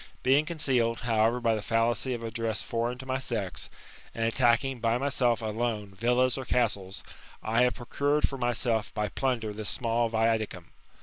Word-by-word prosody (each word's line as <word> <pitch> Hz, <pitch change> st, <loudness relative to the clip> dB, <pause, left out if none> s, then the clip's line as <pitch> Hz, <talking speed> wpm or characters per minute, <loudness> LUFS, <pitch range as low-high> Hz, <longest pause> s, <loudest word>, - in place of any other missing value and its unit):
Being 140 Hz, +4 st, +4 dB
concealed, 130 Hz, -8 st, +1 dB
however, 115 Hz, +1 st, +2 dB
by 115 Hz, -2 st, +2 dB
the 110 Hz, -, -2 dB
fallacy 120 Hz, +3 st, 0 dB
of 115 Hz, -, -7 dB
a 115 Hz, -, -4 dB
dress 110 Hz, -2 st, -2 dB
foreign 120 Hz, +1 st, -2 dB
to 130 Hz, -, -9 dB
my 130 Hz, 0 st, -1 dB
sex, 110 Hz, -8 st, -3 dB, 0.5 s
and 115 Hz, -, 0 dB
attacking 120 Hz, +2 st, +2 dB
by 115 Hz, +1 st, +1 dB
myself 125 Hz, -4 st, +1 dB
alone 110 Hz, -2 st, -2 dB
villas 125 Hz, +5 st, +2 dB
or -, -, -4 dB
castles, 105 Hz, -7 st, -1 dB, 0.4 s
I 115 Hz, +2 st, +2 dB
have 125 Hz, 0 st, +3 dB
procured 145 Hz, +4 st, 0 dB
for 135 Hz, -, -7 dB
myself 120 Hz, -3 st, 0 dB
by 105 Hz, -1 st, -1 dB
plunder 115 Hz, -3 st, -1 dB
this 105 Hz, 0 st, -4 dB
small 115 Hz, -1 st, 0 dB
viaticum. 110 Hz, -5 st, -1 dB
115 Hz, 170 wpm, -28 LUFS, 110-125 Hz, 0.5 s, Being